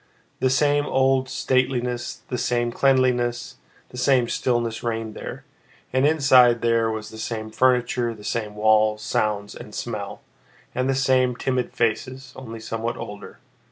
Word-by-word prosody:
The 130 - +2
same 145 +2 +2
old 130 0 +2
stateliness, 125 -2 -1
the 125 - -3
same 120 -1 0
cleanliness, 125 -2 +1 0.3
the 125 - -8
same 130 -2 +3
stillness 120 -3 -1
reigned 115 -2 -3
there, - - -8 0.5
and 130 +2 +3
inside 130 -6 +5
there 115 -1 +2
was 110 -1 -5
the 110 - -10
same 110 -1 -4
furniture, 125 -1 +2
the 105 - -14
same 105 -1 -3
walls, 110 0 +3
sounds, 105 -1 -1
and - - -10
smell, - - -5 0.5
and 130 +1 -1
the 135 - +2
same 130 -2 +2
timid 125 0 -1
faces, 125 +3 -2
only 115 -3 -8
somewhat 115 +1 -4
older. 105 0 -8
120 Hz, 145 wpm, -23 LUFS, 115-130 Hz, 0.5 s, inside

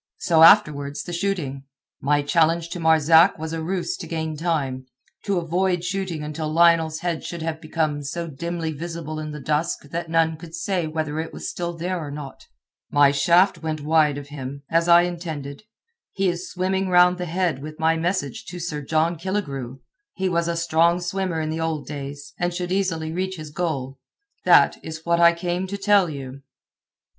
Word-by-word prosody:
So 165 -3 +2
afterwards 145 -3 +5
the 175 - -7
shooting. 170 -8 -2 0.4
My 145 +1 +2
challenge 165 +2 +2
to 175 - -5
Marzak 160 +2 +5
was 160 0 -5
a 165 - -3
ruse 190 - -2
to - - -7
gain 160 -1 -3
time—to 145 +2 -3
avoid 175 +1 0
shooting 185 -4 -3
until 155 +1 -4
Lionel's 165 -1 +3
head 170 -2 -2
should 170 -2 -6
have 160 -1 -3
become 155 -2 -1
so 165 +4 -4
dimly 165 +2 -4
visible 160 0 -5
in 155 0 -5
the 150 0 -7
dusk 150 +1 -2
that 170 0 -4
none 165 -1 +2
could 165 0 -10
say 175 0 -1
whether 155 -1 -3
it 160 - -4
was - - -5
still 175 -1 -4
there 180 +2 -2
or 150 -3 -6
not. 140 -1 -9 0.4
My 145 -1 +5
shaft 170 +7 +3
went 155 -2 -3
wide 150 -1 +3
of 145 0 -8
him, 140 -1 -7
as 165 +1 +2
I 170 0 +7
intended. 165 -3 -5 0.5
He 195 -1 +1
is 175 +1 -4
swimming 190 +1 -1
round 180 0 +5
the 180 - -3
head 170 -5 -1
with 155 +1 -8
my 160 0 +2
message 185 +6 -2
to 180 -2 -7
Sir 155 -3 -4
John 160 +4 0
Killigrew. 140 -9 -4 0.3
He 190 0 -1
was 170 -1 0
a 170 0 -1
strong 170 +1 +3
swimmer 180 -1 -2
in 155 0 -2
the 160 +1 -3
old 160 -2 -2
days, 145 0 -7
and 175 0 0
should 180 0 -3
easily 175 -5 -1
reach 185 +2 -2
his 155 -3 -9
goal. 140 -5 -3 0.5
That - - +5
is 160 0 -8
what 170 0 +2
I 170 0 +7
came 175 +2 -2
to 200 +2 -4
tell 200 -3 +3
you." 135 -2 -7
165 Hz, 185 wpm, -23 LUFS, 150-175 Hz, 0.5 s, I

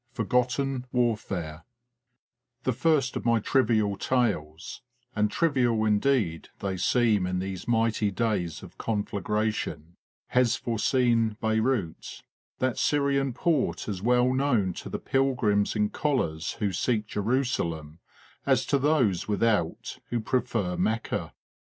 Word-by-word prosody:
FORGOTTEN 125 +2 0
WARFARE 100 -10 -1 1.0
THE 130 - +1
first 140 +1 +1
of - - -3
my 115 -1 +3
trivial 110 -4 +2
tales 95 -10 -1 0.3
and 105 0 +2
trivial 125 -7 +1
indeed 105 -5 +1
they 95 -1 -3
seem 105 0 +2
in 90 0 -1
these 95 +1 -5
mighty 115 -2 +2
days 100 -5 -2
of - - -13
conflagration 105 -5 -2 0.3
has 125 -2 +3
for 115 -3 -3
scene 115 -4 +2
Beyrout, 110 -5 -1 0.3
that 130 -2 -1
Syrian 140 -2 +1
port 155 0 0
as 100 -4 -4
well 125 +3 +3
known 125 -9 +1
to - - -8
the - - -3
pilgrims 125 -7 +1
in 105 -1 +1
collars 125 - -1
who 100 -3 -2
seek 110 +3 0
Jerusalem 100 - -2 0.4
as - - +2
to 140 - +1
those 130 - +2
without 105 -5 0
who 120 - -1
prefer 110 -5 -1
Mecca. 110 +1 -1
115 Hz, 120 wpm, -27 LUFS, 100-125 Hz, 1.0 s, my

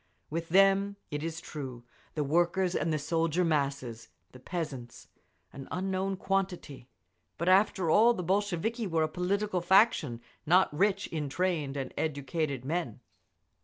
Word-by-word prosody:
With 165 +1 -3
them, 195 +2 +4 0.2
it 145 0 -3
is 165 0 -4
true, 130 -7 -7 0.3
the 150 - 0
workers 175 +5 +1
and 165 - 0
the 155 - +1
soldier 165 +3 0
masses—the 125 - -3
peasants 135 -6 -6 0.4
an 135 - -9
unknown 190 +1 -2
quantity—but 170 - -5
after 190 -1 +4
all 230 +5 +5
the 180 - -4
Bolsheviki 205 +4 -1
were 165 -3 +1
a - - +1
political 185 +3 -1
faction 175 - +3 0.2
not 175 0 +3
rich 195 +3 +2
in 150 -3 -4
trained 155 -4 -1
and 135 -1 -4
educated 145 -2 -2
men…. 160 -6 -3
165 Hz, 130 wpm, -30 LUFS, 140-190 Hz, 0.4 s, all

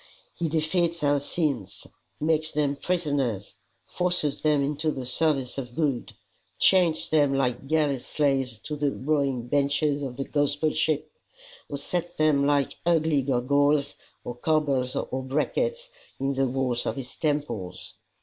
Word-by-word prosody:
He 165 -2 -2
defeats 165 +1 0
our 145 0 +3
sins, 140 - -3 0.3
makes 155 0 0
them 145 -1 +1
prisoners, 140 - -1 0.3
forces 175 -5 0
them 150 -2 +3
into 150 +2 -1
the 130 -4 -3
service 135 -1 0
of 125 -2 -7
good, 145 -7 -1 0.4
chains 175 -4 +4
them 145 -3 +3
like 130 -1 0
galley 150 -3 +2
slaves 135 -3 0
to 150 - -4
the 145 -1 0
rowing 135 -4 0
benches 145 +2 +1
of 130 -3 -5
the 135 - -1
gospel 145 +2 0
ship, 155 -1 0 0.6
or 145 - -3
sets 175 +4 -3
them 150 -2 +3
like 145 -1 +1
ugly 160 -4 +3
gurgoyles 140 +3 +2 0.3
or 120 - -5
corbels 135 -2 +1
or 130 - -2
brackets 475 - -1 0.3
in 135 +1 0
the 135 0 +1
walls 125 -1 -1
of - - -1
his 130 -2 -6
temples. 115 - -3
145 Hz, 140 wpm, -26 LUFS, 135-155 Hz, 0.6 s, chains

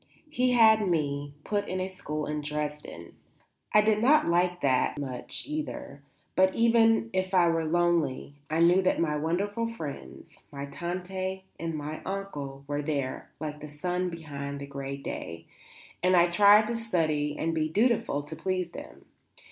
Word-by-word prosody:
He 250 -2 +2
had 220 -3 +6
me 145 -3 -1
put 205 0 -2
at 185 - -2
a 185 - -1
school 155 -5 -5
in 150 0 -3
Dresden. 150 - -5 0.6
I 210 - +6
did 215 0 +2
not 295 +6 +5
like 175 +1 +1
that 130 0 +2
much, 130 -4 -3
either. 300 - -5 0.3
But, 190 0 +4
even 230 -1 +4
if 185 0 0
I 175 -2 +5
were 165 -1 0
lonely, 165 -5 +1 0.2
I 160 +2 +1
knew 175 +3 +5
that 185 - +1
my 155 -3 +1
wonderful 200 +9 -1
friends 150 - -8
my 140 -1 -5
Tante 185 +4 -4 0.2
and 165 -1 -3
my 150 +1 -5
Onkel 145 -9 -5
were 145 0 -1
there, 140 -3 -3
like 150 -1 -5
the 150 0 -8
sun 180 +5 -2
behind 140 -4 -6
the 140 - -6
grey 140 0 -5
day, 85 -11 -6 0.6
and 185 +1 +4
I 175 0 +5
tried 205 +4 +7
to 235 +2 -2
study 155 -10 0
and 165 +1 -1
be 155 -1 0
dutiful 210 - +1
to 150 +2 -8
please 180 +1 -2
them. - - -11
170 Hz, 165 wpm, -28 LUFS, 145-190 Hz, 0.6 s, tried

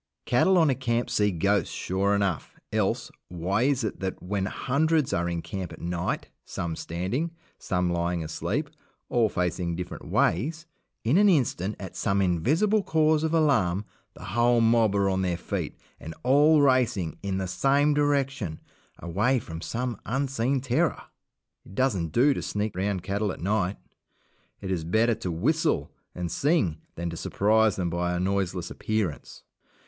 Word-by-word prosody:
Cattle 185 +10 +4
on 160 -5 +5
a - - +3
camp 120 -2 -1
see 105 0 +3
ghosts, 85 -5 +1
sure 100 +2 0
enough 100 -5 -1 0.2
else, - - 0 0.2
why 90 +5 -1
is 135 -1 +2
it 110 - -3
that, 95 -1 -3
when 95 +1 -2
hundreds 150 +5 +1
are 85 +1 0
in 85 -1 -3
camp 95 -3 -5
at - - -10
night 85 0 -2 0.2
some 85 -3 -4
standing, 95 - -2 0.3
some 90 -2 0
lying 85 0 -1
asleep, 120 - -3 0.4
all 115 -3 +3
facing 90 -2 -1
different 90 0 -6
ways 155 - +1 0.4
in 135 - +3
an 205 0 +6
instant, 115 - +1
at 95 - -8
some 100 -1 0
invisible 145 - +2
cause 155 -3 +2
of 160 - 0
alarm, 115 - +2 0.3
the - - -12
whole 120 +4 +2
mob 115 -2 +3
are 100 -1 +2
on 95 -1 +1
their 90 -2 0
feet - - -4 0.2
and 80 0 -8
all 145 +4 +5
racing 120 - +2
in 95 -1 -2
the 95 - -2
same 140 +10 +2
direction, 135 - 0 0.4
away 105 +10 +1
from 80 -8 -6
some 120 0 -3
unseen 135 +1 0
terror? 125 -1 +1 0.6
It 95 - -14
doesn't 100 - 0
do 135 - +4
to - - -4
sneak 105 -1 -2
round 95 -1 -1
cattle 100 0 -1
at - - -8
night; 100 +1 0 0.8
it 95 - -4
is 85 -4 -1
better 110 +8 +2
to 95 -5 -4
whistle 80 0 0 0.2
and 90 -1 -3
sing 105 - +1
than 85 0 -3
to 85 - -6
surprise 110 +3 +2
them 90 -3 -2
by 90 +1 -1
a - - -1
noiseless 95 -2 -1
appearance. 105 -9 -3
100 Hz, 165 wpm, -26 LUFS, 90-130 Hz, 0.8 s, an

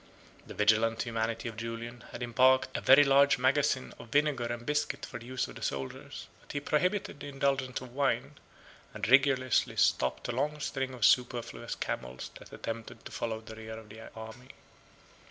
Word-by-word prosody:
The - - -9
vigilant 110 +2 +3
humanity 115 0 -2
of 115 - -6
Julian 115 +1 -6
had 120 - -6
embarked 130 +2 +3
a - - -1
very 135 +3 +8
large 140 0 +5
magazine 130 +1 +1
of - - -10
vinegar 145 -3 +2
and 120 0 -5
biscuit 150 +2 -1
for 120 - -8
the 115 - -12
use 130 0 -2
of - - -10
the - - -10
soldiers, 70 -1 -5 0.2
but - - -11
he 145 - -1
prohibited 175 +4 0
the - - -7
indulgence 135 -2 -1
of 125 -2 -10
wine; 140 0 0 0.6
and - - -2
rigorously 130 0 +4
stopped 65 0 +2
a - - -1
long 150 +5 -1
string 135 -3 -3
of 115 -4 +2
superfluous 125 -2 +1
camels 60 0 -5
that - - -14
attempted 115 0 -7
to - - -8
follow 110 -1 -3
the 110 0 -10
rear 110 0 -8
of 110 -1 -12
the 110 +2 -11
army. 110 +3 -10
120 Hz, 180 wpm, -30 LUFS, 115-135 Hz, 0.6 s, very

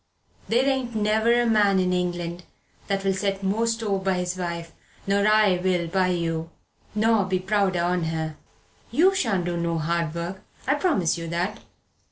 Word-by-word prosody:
There 245 +4 +3
ain't 260 -4 -1
ne'er 220 +3 +3
a - - 0
man 210 -4 +3
in 180 0 +1
England'll 180 +2 -3
set 195 0 -2
more 210 +4 +1
store 225 -4 0
by 190 0 0
his 180 0 -2
wife 170 -2 -4 0.3
nor 200 +1 +2
I 215 -3 +4
will 180 -2 +1
by 185 +1 +2
you, 165 -2 -1 0.5
nor 220 -1 +3
be 190 0 0
prouder 190 -2 +1
on 175 -1 0
her. 160 -1 -3 0.5
You 375 +5 +4
shan't 220 - 0
do 175 -1 -2
no 170 -1 -1
hard 165 0 -1
work 175 +3 -5 0.2
I 270 - +3
promise 285 - +1
you 165 - -5
that. 180 +6 -2
190 Hz, 165 wpm, -25 LUFS, 170-215 Hz, 0.5 s, I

